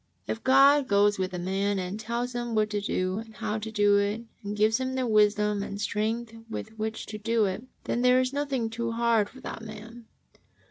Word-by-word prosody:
If 225 - -4
(jod 275 +1 +6
goes 205 0 +3
with 185 0 -1
a 180 - -4
man 195 +3 -1
and 185 +3 -3
tells 235 +3 -3
him 240 -1 -3
what 215 0 +2
to 205 -1 -1
do 185 -1 -1
and 225 -1 -10
how 215 +1 -2
to 220 +1 -6
do 205 -1 +4
it, 205 +3 0 0.2
and 205 +1 -4
gives 215 +2 +3
him 260 0 -2
the 260 -1 0
wisdom 210 -2 +3
and 200 0 -5
strength 220 +2 -2 0.2
with 220 - -5
which 220 0 -3
to 215 - -7
do 225 0 +2
it, 190 +4 -3 0.2
then 240 - -1
there 250 0 +5
is 255 +1 0
nothing 275 -5 -1
too 230 0 -2
hard 230 -3 +2
for 260 - -14
that - - -6
man. 225 +1 -10
220 Hz, 215 wpm, -27 LUFS, 205-235 Hz, 0.2 s, jod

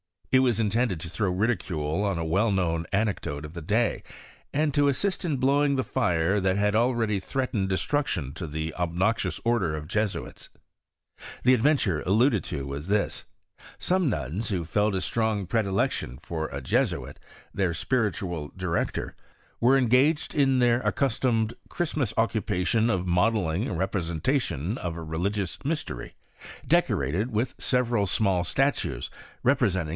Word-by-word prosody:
It 130 - +6
was 120 -4 +2
intended 110 -5 0
to 85 - -6
tiffow 100 +2 -1
ridicule 95 -6 0
on 100 -3 0
a 85 - -2
well 100 +7 +2
known 85 -3 0
anecdote 100 -8 -1
of 75 +1 -8
the 85 - -6
day, 110 +8 +1 0.5
and 150 0 +1
to 145 +1 +3
assist 185 +8 0
in 150 -5 0
blowing 140 +2 +3
the 130 - +1
fire 90 -6 +1
that 100 +2 +1
already 115 -3 +2
threat 130 +6 -2
ened 100 -4 +1
destruction 95 - -1
to 85 - -5
the 80 +1 -4
obnoxious 90 +6 0
order 115 -10 +1
of 75 0 -7
Jesuits. 105 0 -3 0.9
The 125 - +6
adventure 120 - +2
alluded 110 - +3
to 70 -2 -4
was 70 +4 -5
this: 105 +1 0 0.5
Some 180 -4 +1
nuns, 95 - -3
who 90 -5 -1
felt 105 +4 +1
a 95 - 0
strong 110 -1 0
predilection 95 - 0
for 80 +1 -4
a 70 - -6
Jesuit, 65 - -1 0.3
their 95 -4 0
spiritual 90 - -1
director, 90 -3 -2 0.4
were 130 +3 +5
engs^ed 135 +5 +3
in 135 -3 +3
their 120 -1 +4
accustomed 115 -5 +1 0.2
Christmas 155 - -1
occupation 110 -1 +1
of 95 -5 0
modelling 90 +1 +1
a - - -3
representation 90 - -1
' - - -9
a» 90 - -2
religious 85 - -3
mystery, 150 - -3 0.5
decorated 85 - +1
with 115 +4 -1
several 120 -5 +1
small 95 -2 +1
178 135 +10 +2
HISTORY 60 -2 -4
OF - - -21 0.4
CflEinSTIlT. 95 -9 +1
100 Hz, 150 wpm, -26 LUFS, 85-120 Hz, 0.9 s, It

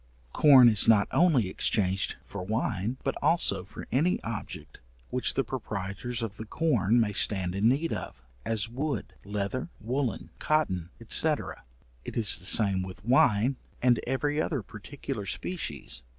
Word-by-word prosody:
Corn 135 -5 +8
is 110 -3 +3
not 110 -3 +5
only 155 - +3
exchanged 95 0 0
for 100 - -7
wine, 110 +3 -2
but 135 - 0
also 160 - +1
for 100 - -10
any 160 +9 +2
object 110 -2 -7 0.3
which 125 0 0
the 135 - +2
proprietors 115 0 -4
of 110 -2 -5
the 110 - -6
corn 120 - +2
may 105 -3 +1
stand 95 -3 0
in 100 +4 +3
need 150 +6 0
of 65 - -7 0.2
as 110 -1 -1
wood, 140 +5 -4
leather, 105 +8 -3
woollen, 125 +2 -3
cotton, 95 - 0 0.2
&c. 160 - +2 0.8
it - - -7
is 105 -3 +4
the 90 - -6
same 100 -1 +4
with 95 +2 -8
wine 125 0 +3 0.2
and 120 -2 +3
every 145 +4 0
other 140 -9 -2
particular 110 +1 -7
species. 170 - -3
115 Hz, 150 wpm, -28 LUFS, 100-135 Hz, 0.8 s, Corn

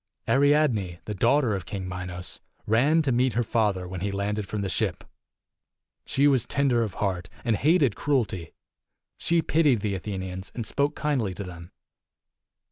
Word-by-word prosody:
275 - - +1
III. - - +4 0.5
Ariadne, 85 0 -12
the 105 - -4
daughter 120 +4 +3
of 95 -4 -6
King 95 -2 -4
Minos, 90 0 -6 0.3
ran 140 +9 +3
to 135 - +1
meet 125 0 +2
her 120 +3 +1
father 105 -5 0
when 90 0 -5
he 100 +1 -1
landed 100 +1 -2
from 105 0 -3
the 100 - -1
ship. - - -1 1.0
She 140 +2 +3
was 135 -5 +2
tender 135 -4 +2
of 105 -5 -2
heart, 95 -4 -2 0.2
and 115 -2 +2
hated 145 - +3
cruelty. 115 - -1 0.7
She 170 -1 +2
pitied 150 -9 +3
the 105 -1 -1
Athenians, 95 -1 -5
and 115 - -3
spoke 140 +5 0
kindly 130 -11 -1
to 100 - -5
them. 85 -1 -10
105 Hz, 170 wpm, -26 LUFS, 95-135 Hz, 1.0 s, III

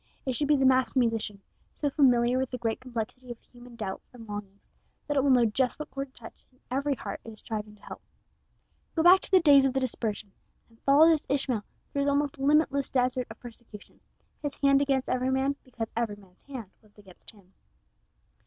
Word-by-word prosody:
It 260 - -1
should 290 +4 -1
be 295 0 +4
the 270 - +2
master 260 -1 +3
musician, 225 -5 0 0.3
so 290 -2 -1
familiar 250 -3 +3
with 260 -1 -1
the 250 - -4
great 225 -2 -2
complexity 250 0 -6
of 240 - -6
human 245 0 -16
doubts 195 -4 -6
and 230 -3 -12
longings, 205 -1 -8 0.4
that 290 - -2
it 275 - +4
will 280 - +2
know 250 -3 +5
just 250 +4 0
what 300 - -7
chord 275 0 -4
to - - -9
touch 225 - -12
in 255 - -30
every 280 +2 0
heart 200 -4 -7
it - - -9
is 215 - -13
striving 210 -1 -6
to 210 - -26
help. - - -9 0.9
Go 320 - +2
back 360 +2 +8
to - - -8
the 380 - +6
days 285 -5 +6
of 270 -1 +1
the 270 - +1
dispersion, 220 -5 -3 0.4
and 225 0 -26
follow 285 +4 +6
this 320 -3 +2
Ishmael 260 -5 0 0.3
through 280 - -2
his 280 0 +2
almost 280 -1 0
limitless 280 0 +2
desert 255 -1 0
of 225 - -11
persecution 230 -3 -12 0.4
his 290 -2 -4
hand 275 0 +3
against 270 -2 +1
every 255 0 0
man 265 +1 +1
because 235 -3 -6
every 230 -3 -1
man's 190 -3 -21
hand 245 -8 -8
was 210 -1 -26
against 190 -3 -15
him. 195 -3 -19
255 Hz, 210 wpm, -28 LUFS, 225-275 Hz, 0.9 s, back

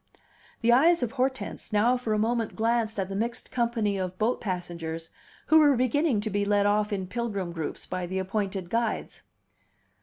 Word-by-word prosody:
The 235 0 +4
eyes 320 +4 +5
of 235 - -1
Hortense 260 -1 -2
now 220 +4 +3
for 245 -3 -3
a - - +1
moment 225 +1 0
glanced 230 -1 0
at 195 -2 -1
the 195 - -5
mixed 235 +4 -3
company 230 -5 0
of 185 0 -4
boat 225 +5 0
passengers, 170 -4 -4 0.3
who 315 - +6
were 290 -3 +5
beginning 255 0 +2
to 215 0 -3
be 205 +1 +1
led 205 0 +2
off 210 +1 +2
in 195 -2 -2
pilgrim 200 -3 -3
groups 165 -3 -5
by 185 -1 -4
the 190 +2 -3
appointed 190 -1 -2
guides. 230 -1 -1
215 Hz, 180 wpm, -27 LUFS, 190-240 Hz, 0.3 s, who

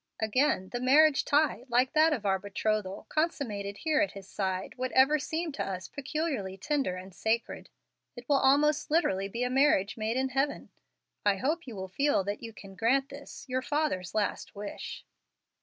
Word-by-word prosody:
Again, 220 -3 +1
the 245 - -3
marriage 280 +3 +5
tie, 290 -4 +2
like 250 +2 +2
that 315 +1 +5
of 240 -9 -2
our 190 -1 +2
betrothal, 205 0 -2
consummated 215 -11 -2
here 310 -1 +1
at 305 - 0
his 195 -2 -10
side, 190 -1 -3
would 255 0 -3
ever 270 +4 +5
seem 320 +4 -3
to 275 - -3
us 185 -2 -5
peculiarly 285 - -3
tender 285 -8 -1
and 185 +1 -9
sacred. 225 +5 -2 0.5
It 240 -1 -11
will 285 - +4
almost 290 +2 +3
literally 195 - +1
be 235 +5 -3
a 250 - 0
marriage 255 -8 +3
made 220 +2 -1
in 265 0 0
heaven. 275 +2 -1 0.5
I 205 -1 +3
hope 300 - -2
you 235 - -7
will 190 -1 -5
feel 275 +2 +1
that 205 +2 -4
you 230 -1 -7
can 195 -3 -12
grant 260 +8 +1
this, 280 +1 -10
your 255 0 -1
father's 290 - -1
last 210 0 -2
wish." 205 0 -7
250 Hz, 180 wpm, -29 LUFS, 200-290 Hz, 0.5 s, marriage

